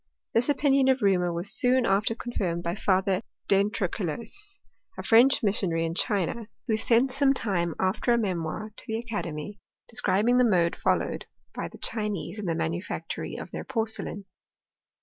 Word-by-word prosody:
This 240 +5 +3
opinion 275 -1 +3
of 265 -2 +3
Reaumur 180 -3 +3
was 175 +4 -1
soon 255 -1 +4
after 200 +3 +2
confirmed 185 -8 -3
by 170 -1 -1
Father 190 0 +1 0.3
d'Entrecolles, 205 - -1 0.4
a - - -5
French 245 +4 +5
missionary 185 -5 +1
in* 165 - -2
China, 205 +3 -1 0.2
who 220 - +1
sent 235 +4 +3
some 275 +1 +3
time 175 -8 -1
after 190 +6 +1
a 235 - +4
memoir 195 0 -2
to - - -12
the 220 - -1
academy, 205 -5 -5 0.3
de 235 - -16
scribing 220 +6 +2
the - - +6
mode 180 -7 +3
followed - - -1 0.3
by - - -4
the - - -13
Chinese 210 -2 -3
in 205 - -4
the 165 -2 0
ma - - 0
nufactory 170 +4 -4
of - - -8
their - - -5
porcelain. 220 -4 -2
210 Hz, 165 wpm, -27 LUFS, 185-235 Hz, 0.4 s, the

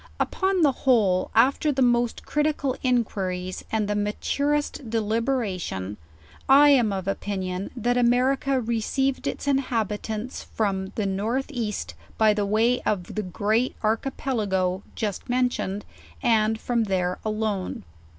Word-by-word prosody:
Upon 380 -2 +1
the 290 - +5
whole, 215 -9 +2
af 250 +5 +5
ter 305 - +1
the 265 -2 +2
most 240 -1 +1
critical 295 -3 0
inquiries, 190 -7 -1
and 215 -2 0
the 210 - 0
maturest 280 +6 -1
deliberation, 215 - -1 0.5
I 285 +2 +8
am 245 -7 +4
of 190 -1 -3
opinion, 190 -1 -3
that 245 +1 +1
America 255 +3 +2
received 240 +3 -1
its - - -4
inhabitants 225 -4 -1
from 195 -3 -2
the 215 - -1
N. 210 +7 0
E. 235 -7 -2 0.5
by 215 -1 +5
way 215 +4 +2
of 185 -4 -2
the 215 - -1
Great 215 +6 0
Archipelago 215 -5 0
just 210 +1 -3
mentioned, 245 -5 0 0.4
and 220 -1 +3
from 235 -1 0
there 185 -2 -1
alone. 215 - -2
220 Hz, 125 wpm, -25 LUFS, 200-255 Hz, 0.5 s, I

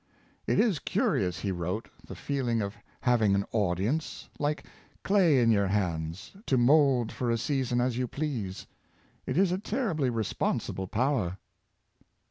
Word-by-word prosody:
" - - -34
It - - +2
is 205 -11 +3
curious," 90 -3 0
he 100 - -1
wrote, 90 +5 -3 0.2
'^ - - -24
the - - -7
feeling 130 -5 -1
of 100 -2 -2 0.3
having 110 -5 +3
an 100 0 0
audience, 105 - -1
like 150 +1 -1 0.4
clay 180 -9 +4
in 115 -1 +4
your 100 -2 +3
hands, 90 -1 -2 0.2
to 130 - +3
mould 130 -2 +4
for 125 - -2
a 115 - +2
season 125 0 0
as 125 0 0
you 125 - 0
please. 120 -11 -4 0.6
It 130 - -1
is 190 -1 +4
a 185 - 0
terribly 190 - -1
responsible 110 -4 -2
power. 110 -5 0
120 Hz, 155 wpm, -29 LUFS, 100-140 Hz, 0.6 s, clay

